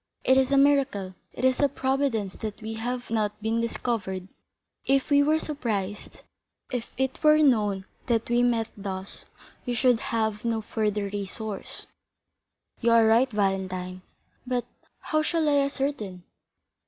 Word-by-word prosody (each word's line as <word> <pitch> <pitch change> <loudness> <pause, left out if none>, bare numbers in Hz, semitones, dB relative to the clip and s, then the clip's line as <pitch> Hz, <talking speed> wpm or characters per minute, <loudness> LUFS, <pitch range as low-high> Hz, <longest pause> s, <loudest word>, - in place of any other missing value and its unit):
It 260 - +5
is 265 0 +3
a 275 - +4
miracle, 275 -9 +3 0.2
it 255 - -3
is 260 -1 +3
a 285 - +4
providence 265 -7 0
that 215 -2 -5
we 220 +1 -4
have 245 +2 -4
not 210 -2 0
been 225 +2 0
discovered. 195 -5 -2 0.5
If 275 +2 +1
we 285 0 +6
were 305 +2 +3
surprised, 215 -11 -4 0.5
if 245 -2 -4
it 265 0 -1
were 305 0 +6
known 210 -10 +3 0.2
that 230 -2 +1
we 240 0 +2
met 235 -2 +2
thus, 195 -1 -6 0.4
we 245 - 0
should 245 -1 +3
have 220 -3 -1
no 230 -1 0
further 210 -1 -1
resource." 205 +1 -5 0.9
"You 235 - +2
are 230 -1 +6
right, 230 +4 +4
Valentine; 190 -3 -1 0.5
but 250 -1 -1 0.4
how 310 - +1
shall 320 0 0
I 290 -1 +4
ascertain?" 275 -10 -2
230 Hz, 145 wpm, -26 LUFS, 205-265 Hz, 0.9 s, we